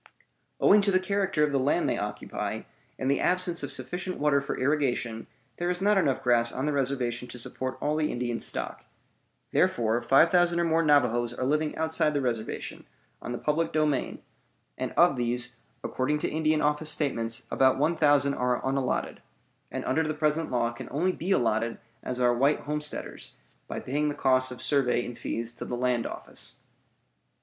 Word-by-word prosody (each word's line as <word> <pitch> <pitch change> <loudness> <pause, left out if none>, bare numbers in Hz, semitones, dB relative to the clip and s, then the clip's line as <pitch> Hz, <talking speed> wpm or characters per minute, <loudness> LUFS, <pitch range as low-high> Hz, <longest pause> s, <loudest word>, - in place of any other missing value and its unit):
Owing 205 +1 +6
to 200 0 +1
the 185 - +4
character 190 -4 0
of 150 - +2
the 140 - +1
land 135 +3 +1
they - - +1
occupy, - - -4 0.4
and 130 - -3
the 140 - +1
absence 180 -1 +1
of - - -4
sufficient 185 +1 -2
water 145 -1 +2
for 140 - -4
irrigation, 130 -5 0 0.3
there 175 0 -1
is 180 0 -1
not 205 +2 +3
enough 135 -8 +1
grass 120 -2 +3
on 130 - -3
the 150 - 0
reservation 125 -3 -1
to 125 - -9
support 130 +2 -4
all 150 - 0
the 155 -1 0
Indian 120 -1 -2
stock. - - -4 0.7
Therefore 115 0 +2
5,000 170 +7 +4
or - - +2
more 165 0 +2
Navajoes 125 -6 +2
are 130 - -2
living 150 +2 0
outside 160 -1 +1
the - - +2
reservation, 115 -4 -4 0.3
on - - -5
the 120 - -3
public 160 +4 0
domain; 150 -3 0 0.5
and - - -3
of 170 -6 +4
these, 120 0 -1 0.3
according 140 +4 0
to - - -2
Indian 155 0 +1
Office 150 +1 +1
statements, 120 -7 -1
about 130 -1 +4
1,000 145 -2 +3
are 125 -2 0
unallotted, 135 -1 -1 0.5
and - - -5
under 160 - +1
the 155 -1 -1
present 155 +1 0
law 120 -2 0
can 120 - -9
only 175 +6 +1
be 180 0 -5
allotted 115 - +1 0.2
as 125 0 -3
are 120 -1 +4
white 140 +5 +2
homesteaders, 150 0 -4 0.3
by - - -4
paying 150 +3 -1
the 145 - -3
costs 130 -1 +3
of 125 - -7
survey 125 -4 +2
and 120 - -8
fees 115 0 -2
to 120 - -8
the 120 - -4
land 125 -1 0
office. - - -8
140 Hz, 180 wpm, -27 LUFS, 125-155 Hz, 0.7 s, Owing